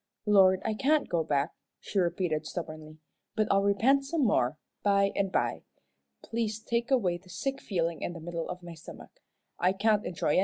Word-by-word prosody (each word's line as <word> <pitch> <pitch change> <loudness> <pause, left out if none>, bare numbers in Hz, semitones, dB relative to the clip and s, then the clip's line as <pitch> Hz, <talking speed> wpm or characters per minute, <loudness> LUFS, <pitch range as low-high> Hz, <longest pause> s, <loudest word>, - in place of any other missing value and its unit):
"Lord, 190 -3 +5
I 220 - +1
can't 285 +7 +2
go 170 -2 0
back," 145 0 0 0.3
she 200 - -2
repeated, 170 -3 0
stubbornly, 155 -2 -7 0.4
"but 215 -1 +2
I'll 195 - +4
repent 230 +8 +3
some 290 0 0
more, 150 - +2 0.2
by 200 -1 +3
and 195 -1 0
by. - - 0 0.6
Please 225 -2 -2
take 235 +2 -1
away 200 -10 +2
the 185 +1 -20
sick 270 +9 -3
feeling 170 -4 -1
in - - -3
the 170 - -8
middle 170 0 -5
of 180 0 -6
my 170 -1 -8
stomach. 160 -1 -12 0.5
I 180 +2 +3
can't 210 +1 +2
enjoy 170 - -2
anythin'." 150 - +4
190 Hz, 185 wpm, -29 LUFS, 170-220 Hz, 0.6 s, Lord